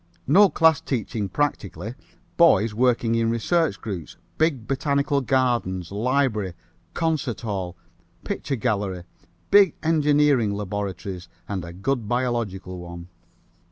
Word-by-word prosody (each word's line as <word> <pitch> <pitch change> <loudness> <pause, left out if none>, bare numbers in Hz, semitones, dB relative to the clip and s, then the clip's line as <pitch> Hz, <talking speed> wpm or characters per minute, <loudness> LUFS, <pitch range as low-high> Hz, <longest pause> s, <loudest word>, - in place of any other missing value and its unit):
No 195 +8 +6
class 160 -3 +4
teaching 110 -5 -3
practically, 120 -6 -2 0.4
boys 115 - +5
working 120 0 +2
in 115 0 +2
research 160 +8 +1
groups, 95 -8 -6 0.2
big 150 -8 +1
botanical 140 0 +1
gardens, 120 -10 0
library, 110 -4 0 0.4
concert 150 -9 -1
hall, 95 -6 -4 0.5
picture 140 - -3
gallery, 100 -5 -1 0.5
big 200 -5 +6
engineering 150 -8 +3
laboratories 95 -3 -5 0.2
and 95 -3 -3
a 85 - -7
good 110 +5 -2
biological 115 -7 -2
one. 85 0 -9
115 Hz, 110 wpm, -24 LUFS, 95-140 Hz, 0.5 s, No